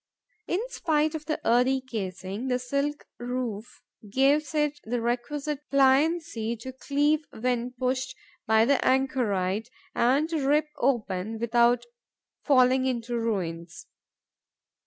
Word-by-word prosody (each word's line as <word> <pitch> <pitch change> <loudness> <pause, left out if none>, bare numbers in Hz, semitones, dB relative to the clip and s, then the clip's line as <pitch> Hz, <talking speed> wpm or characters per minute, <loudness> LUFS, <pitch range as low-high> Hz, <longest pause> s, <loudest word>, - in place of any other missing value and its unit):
In 355 - 0
spite 310 -9 0
of 305 -2 -6
the 310 - -1
earthy 250 +3 +3
casing, 200 -2 -5
the 250 -1 +1
silk 280 +4 -2
woof 240 -3 -5 0.3
gives 285 +5 +2
it 295 -1 0
the 240 +2 -2
requisite 275 +5 -2
pliancy 275 -3 +2
to 255 +3 -8
cleave 290 +3 +1
when 245 +1 -2
pushed 255 +1 -2 0.3
by 220 0 +5
the 280 +1 +2
anchorite 225 -6 +1 0.2
and 270 +6 +2
to 320 -4 -1
rip 300 +2 +2
open 220 -5 -1
without 235 +1 +2 0.6
falling 260 -2 +4
into 240 -1 -2
ruins. 175 -8 -3
255 Hz, 115 wpm, -27 LUFS, 230-280 Hz, 0.6 s, by